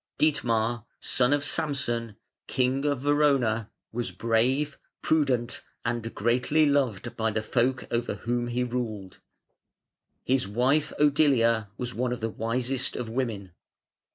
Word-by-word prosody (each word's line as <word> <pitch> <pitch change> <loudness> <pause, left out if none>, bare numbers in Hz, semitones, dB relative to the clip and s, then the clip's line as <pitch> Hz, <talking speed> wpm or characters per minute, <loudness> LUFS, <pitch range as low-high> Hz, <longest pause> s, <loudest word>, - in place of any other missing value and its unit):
Dietmar, 120 -6 +1
son 130 0 +2
of 145 0 +2
Samson, 140 -8 0 0.3
King 130 +2 0
of 145 -3 0
Verona, 135 -7 +2 0.2
was 120 +1 -3
brave, 125 +6 0 0.2
prudent, 130 -6 +1 0.2
and 115 -1 -2
greatly 125 +7 +2
loved 130 -6 0
by 110 0 0
the 110 0 -2
folk 125 +3 0
over 120 0 -1
whom 120 0 -2
he 120 +1 -1
ruled. 115 -6 -4 1.0
His 130 -5 +1
wife 130 +8 +1
Odilia 135 -7 +3
was 120 -1 -3
one 125 +1 -1
of 125 - -3
the 115 0 -2
wisest 125 +4 -1
of 120 -2 -4
women. 110 -6 -3
125 Hz, 125 wpm, -27 LUFS, 115-135 Hz, 1.0 s, Odilia